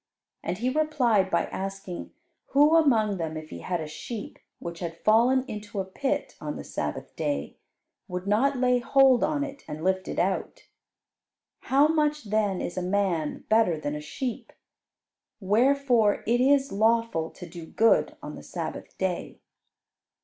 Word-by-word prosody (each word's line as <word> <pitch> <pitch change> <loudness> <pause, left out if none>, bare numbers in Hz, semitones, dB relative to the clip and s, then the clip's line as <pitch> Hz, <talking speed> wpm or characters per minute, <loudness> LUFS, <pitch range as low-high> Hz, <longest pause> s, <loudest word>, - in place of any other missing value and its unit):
and 175 +2 -3
He 245 +5 0
replied 255 -10 +2
by - - +1
asking 195 -2 -6 0.4
who 295 +3 +6
among 225 -11 +3
them, 160 -2 -3
if 155 0 -9
he - - -7
had 180 -2 -2
a 160 - -4
sheep 210 +8 -7 0.2
which 170 -1 -7
had 165 -2 -5
fallen 245 +6 +4
into 210 -3 -6
a 190 - -1
pit 265 +9 -2
on - - -4
the - - -6
Sabbath - - -5
day, 290 -1 -2 0.5
would 180 -1 -5
not 250 +7 +2
lay 250 0 +3
hold 265 0 +4
on 295 -2 +1
it, 280 -1 -7
and 155 +1 -6
lift 190 0 0
it - - -5
out. - - -1 1.0
"How 280 +3 +3
much 300 -2 +1
then 205 -4 +1
is 175 - -5
a - - -3
man 180 -4 -1
better 215 -7 +3
than 145 -1 -3
a 150 - -4
sheep? 235 - -5 0.9
Wherefore 235 +1 +3
it 240 +2 +2
is 275 +1 +3
lawful 220 -6 +1
to 180 - -11
do 165 -1 -9
good 225 +6 +3
on - - -6
the - - -9
Sabbath - - -6
day." 185 -2 -3
215 Hz, 160 wpm, -27 LUFS, 185-265 Hz, 1.0 s, who